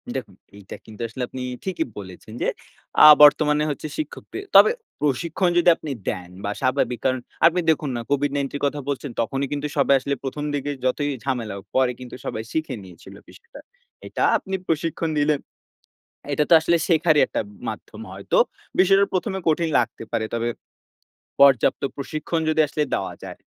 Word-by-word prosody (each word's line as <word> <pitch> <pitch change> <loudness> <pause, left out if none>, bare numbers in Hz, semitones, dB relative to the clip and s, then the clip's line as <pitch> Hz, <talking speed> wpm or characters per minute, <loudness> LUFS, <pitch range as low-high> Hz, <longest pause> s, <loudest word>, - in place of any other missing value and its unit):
দেখুন, - - -5 0.2
এইটা 100 -1 -10
কিন্তু 110 0 -11
আসলে 125 +3 -5
আপনি 130 - -7 0.2
ঠিকিই 180 -4 -2
বলেছেন, 95 +2 -10
যে - - +1 0.6
আ - - +11 0.2
বর্তমানে 150 0 +5
হচ্ছে 150 - -5
শিক্ষকদের 310 +5 -6
তবে 445 - +9 0.3
প্রশিক্ষণ 165 +6 0
যদি 175 0 +5
আপনি 155 -3 -7 0.2
দেন 90 -1 -5
বা 100 - -2
স্বাভাবিক। 130 -2 0
কারণ 130 -1 +2 0.3
আপনি 170 +2 +4
দেখুন, 155 -2 +1
না 120 - -3
COVID-19 140 0 0
এর 145 - -4
কথা 145 +1 -1
বলছেন। 140 -1 -3
তখনই 135 +4 -2
কিন্তু 145 +1 -2
সবাই 140 0 +4
আসলে 140 +2 -2
১ম, 140 +2 -4
দিকে 145 0 -2
যতই 145 +3 0
ঝামেলা 125 -6 -2
হোক, 95 - -11
পরে 130 -1 +3
কিন্তু 125 -1 -9
সবাই 110 - -4
শিখে 155 -4 -2
নিয়েছিল 90 -3 -14
বিষয়টা। 465 - -15 0.5
এটা - - -2
আপনি 190 -1 -5
প্রশিক্ষণ 165 +1 -1
দিলেন। 145 0 +2 0.9
এটা 150 +1 +2
তো - - +8
আসলে 170 +2 +2
শেখারি 160 -2 +3
একটা - - -2 0.3
মাধ্যম - - -7
হয়তো। - - -2 0.4
বিষয়টা 195 +1 +5
১ম, 185 - -1
এ - - -6
কঠিন 165 +1 +1
লাগতে 115 -1 -2
পারে। 115 -1 0
তবে 115 0 -1 0.9
পর্যাপ্ত 135 -4 +5
প্রশিক্ষণ 155 +4 -3
যদি 155 0 0
আসলে 150 +1 -1
দেওয়া - - -2
যায় - - -9
145 Hz, 170 wpm, -23 LUFS, 130-160 Hz, 0.9 s, আ